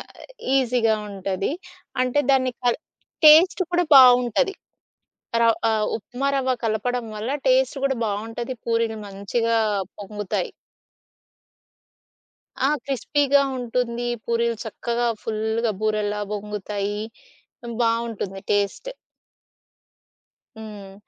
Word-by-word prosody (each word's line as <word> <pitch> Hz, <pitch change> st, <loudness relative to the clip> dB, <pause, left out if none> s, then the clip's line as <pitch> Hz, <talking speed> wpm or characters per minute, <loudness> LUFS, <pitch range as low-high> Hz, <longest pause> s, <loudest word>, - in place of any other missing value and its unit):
ఆహ్, -, -, -13 dB, 0.4 s
ఈజీగా 240 Hz, -3 st, +2 dB, 0.2 s
ఉంటది. 195 Hz, +2 st, -2 dB, 0.5 s
అంటే 255 Hz, +3 st, +2 dB
దాన్ని 260 Hz, -2 st, +2 dB
కల్ 240 Hz, +3 st, +2 dB, 0.5 s
టేస్ట్ 350 Hz, +5 st, +7 dB
కూడా 350 Hz, 0 st, +3 dB
బావుంటది. 250 Hz, -, +6 dB, 0.9 s
రవ్ 230 Hz, -1 st, +4 dB
ఆహ్, 215 Hz, -1 st, +1 dB
ఉప్మా 245 Hz, +5 st, -4 dB
రవ్వ 260 Hz, -1 st, +1 dB
కలపడం 230 Hz, +3 st, -1 dB
వల్ల, 220 Hz, +4 st, -4 dB, 0.2 s
టేస్ట్ 260 Hz, +1 st, +3 dB
గూడా 270 Hz, -2 st, 0 dB
బావుంటది. 225 Hz, +4 st, -4 dB
పూరీలు 230 Hz, -1 st, 0 dB
మంచిగా 225 Hz, +4 st, -1 dB, 0.4 s
పొంగుతాయి. 205 Hz, -1 st, -3 dB, 2.2 s
ఆ! -, -, +2 dB, 0.2 s
క్రిస్పీగా 280 Hz, +1 st, +2 dB, 0.2 s
ఉంటుంది. 240 Hz, 0 st, -2 dB, 0.2 s
పూరీలు 235 Hz, -1 st, 0 dB
చక్కగా 235 Hz, +2 st, -2 dB, 0.2 s
ఫుల్లుగా 220 Hz, +1 st, -1 dB
బూరల్లా 210 Hz, -1 st, 0 dB
బొంగుతాయి. 205 Hz, 0 st, -4 dB, 0.6 s
హ్మ్, 235 Hz, -1 st, -6 dB
బావుంటుంది 230 Hz, -4 st, -1 dB
టేస్ట్. 205 Hz, -, -1 dB, 1.7 s
హ్మ్. 205 Hz, -3 st, -9 dB
230 Hz, 95 wpm, -23 LUFS, 210-250 Hz, 2.2 s, టేస్ట్